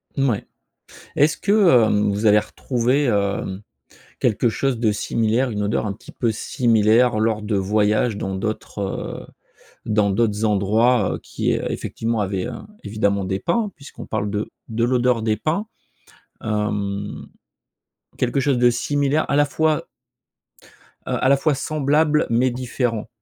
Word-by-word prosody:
Mouais. 135 -7 0 0.7
Est-ce 150 +2 +3
que, 200 - 0
heu, 120 - +4
vous 105 +2 -1
avez 105 0 +6
retrouvé, 125 +5 0
hem, 100 -3 -1 0.6
quelque 120 0 +2
chose 130 +2 -1
de 110 -2 +2
similaire, 115 +4 0
une 105 -2 -2
odeur 105 +1 0
un 100 - -2
petit 100 - -14
peu 120 - 0
similaire, 115 +1 +2
lors 110 -1 0
de 105 -1 -1
voyages 105 +3 +1
dans 95 -1 -3
d'autres, 105 +2 -4
heu, 95 -1 -4 0.6
dans 105 -2 +2
d'autres 105 +1 +1
endroits, 105 +2 +2
heu, - - -7
qui - - -2
effectivement, 115 0 -2
avait, 95 0 -2
heu, - - -5 0.3
évidemment 100 -1 0
des 95 +1 -2
pins, 205 - 0
puisqu'on 140 0 -11
parle 105 -2 -2
de 105 +1 -3 0.2
de 115 +1 -2
l'odeur 125 -1 +2
des 110 -1 +1
pins, 165 - -1 0.8
hem, 105 -2 -3 0.9
quelque 125 +2 0
chose 135 -1 +1
de 120 0 +5
similaire 145 +4 0
à 140 - +2
la 145 0 +4
fois 155 +1 0 1.2
heu, - - 0
à 130 - +3
la 140 - +5
fois, 150 +1 +1
semblable, 150 +2 +1
mais 120 +3 +2
différent? 120 -3 -2
115 Hz, 145 wpm, -21 LUFS, 105-130 Hz, 1.2 s, avez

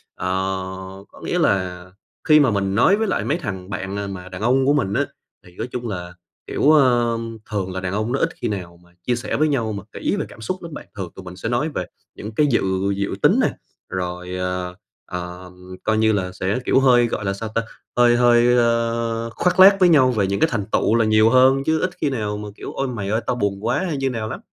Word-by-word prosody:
ờ, 90 - -4 0.8
có - - -17
nghĩa - - -1
là 90 -2 0 0.4
khi 155 -3 +6
mà 135 -5 +4
mình 100 -1 -1
nói 155 - +5
với 220 0 0
lại 190 - 0
mấy 150 - 0
thằng 95 - -6
bạn, 95 0 -4
à, 100 0 -3
mà 95 -2 -7
đàn 90 +1 -8
ông 130 +4 +3
của 140 - +4
mình 115 -9 0
á, - - +1 0.4
thì 90 -1 -17
nói 115 - -3
chung 120 -1 -4
là, 90 -4 -5 0.3
kiểu, 145 - +3
ờ, 120 -6 +4 0.3
thường 95 -3 -2
là 95 - -3
đàn 95 0 -3
ông 110 +3 -1
nó 135 - 0
ít 165 - +2
khi - - 0
nào 90 -5 -5
mà 85 - -23 0.2
chia 125 - +2
sẻ 120 - -3
với 155 - +3
nhau 120 -7 0
mà 100 -2 -6
kỹ - - -2
về - - -2
cảm - - -13
xúc 185 +12 -4
lắm 165 -2 -8
bạn, - - -9
thường 95 -4 -5
tụi 95 - -10
mình 90 0 -8
sẽ 100 +5 -4
nói 125 +7 0
về 95 - -3 0.3
những 105 - -7
cái 150 - +3
dự 125 - +2 0.3
dự 100 0 -2
tính - - +4
nè, - - +3 0.4
rồi, 90 0 -4
ờ, 90 0 -3 0.3
ờ, 90 0 -7 0.3
coi 110 0 +1
như 110 0 +3
là 95 -3 -1
sẽ, 95 +5 -2
kiểu, - - +4
hơi, 125 -3 +5
gọi 105 - -4
là 100 - 0
sao 110 +3 -5
ta 115 - +2 0.4
hơi 120 0 +5
hơi, 120 0 +5
ơ, 115 -1 0
khoác 180 +9 0
lác 195 +1 +9
với 180 -2 +6
nhau 130 -6 +5
về 105 -5 +1
những 100 +1 -1
cái 160 - +3
thành 105 -4 -1
tựu 110 - +2
là 115 -1 +3
nhiều 110 +1 +4
hơn, 130 +2 +5
chứ 160 0 +2
ít 185 - +1
khi 150 - +2
nào 105 -5 -2
mà, 105 0 -6
kiểu: - - -8
"Ôi, 135 - -2
mày 105 -6 -4
ơi 110 +3 0
tao - - +1
buồn 100 -2 -2
quá" 125 +8 +1
hay 150 - -2
như 135 0 0
nào 115 -3 -4
lắm. - - -5
110 Hz, 250 wpm, -21 LUFS, 95-130 Hz, 0.8 s, lác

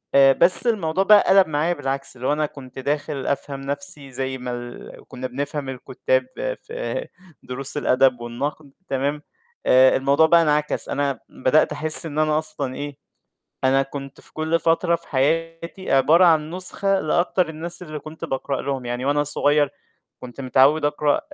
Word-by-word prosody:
آآ 135 0 +7
بس 180 - +7
الموضوع 190 -4 0
بقى 210 0 +6
قَلب 190 -1 +5
معايا 155 +3 0
بالعكس، 135 -3 -4
اللي 125 +1 -5
هو 145 - +2
أنا 155 0 0
كنت 135 -3 -11
داخل 145 0 -3
أفهم 140 -1 -3
نَفْسي 140 0 -3
زي 130 +1 -4
ما 125 0 -6
ال 120 0 -8 0.2
كنا 130 +1 -6
بنفهم 140 +2 -5
الكُتّاب - - -2 0.4
في - - -5 0.4
دروس 135 +3 -6
الأدب 130 -3 +2
والنقد، 140 +5 -6 0.2
تمام، 140 +2 -2 0.4
آآ 130 +1 +5
الموضوع 140 +4 +3
بقى 170 +1 +5
انعكس، 150 -1 0
أنا 140 -2 -2
بدأت 130 +4 +1
أحس 155 +2 +5
إن 155 -1 -4
أنا 155 0 +2
أصلًا 140 -4 -3
إيه، 145 -1 -7 0.7
أنا 135 +1 +3
كنت 135 0 -9
في - - -18
كلّ 160 +1 -1
فترة 170 +1 +1
في 170 - -18
حياتي 165 +6 -2
عبارة 155 +7 +5
عن 160 -2 +3
نسخة 195 +1 -1
لأكتر 175 +2 0
الناس 170 +3 -3
اللي 155 -3 -7
كنت 155 +3 -10
باقرأ 135 0 -3
لهم، 135 -3 -4
يعني 120 +1 -4
وأنا 145 +1 +1
صغيّر 145 -1 +1 0.5
كنت 125 +2 -10
متعوّد 135 +4 +3
أقرأ 145 0 +1
145 Hz, 165 wpm, -22 LUFS, 135-160 Hz, 0.7 s, آآ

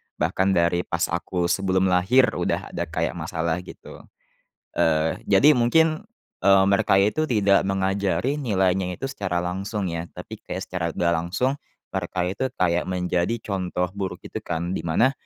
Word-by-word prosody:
bahkan 95 +1 +1
dari 85 0 +1
pas 85 +1 -1
aku 85 +1 -1
sebelum 95 -1 +1
lahir 105 +9 +4
udah - - -2
ada - - -3
kayak - - -2
masalah, 80 +1 -2
gitu. 90 - -12 0.8
Eee, 80 0 +2
jadi 135 +10 +6
mungkin, 160 - +2 0.4
eee, 95 -1 +6
mereka 100 0 +3
itu 155 +10 +1
tidak 100 -6 +3
mengajari 95 - 0
nilainya 95 -7 0
itu - - -8
secara 90 -8 -2
langsung, 95 +2 -3
ya, 85 0 -4
tapi 105 +5 -9
kayak 95 - -4
secara 90 -2 -4
nggak 85 0 +1
langsung, 90 +12 0 0.3
mereka 95 -1 -3
itu 100 +8 -3 0.2
kayak 90 -1 +2
menjadi 90 +3 0
contoh 90 -2 -2
buruk, 95 -2 -4
gitu, - - -6
kan, 85 +1 -3
di - - -2
mana, 115 +11 +3
95 Hz, 155 wpm, -24 LUFS, 90-100 Hz, 0.8 s, jadi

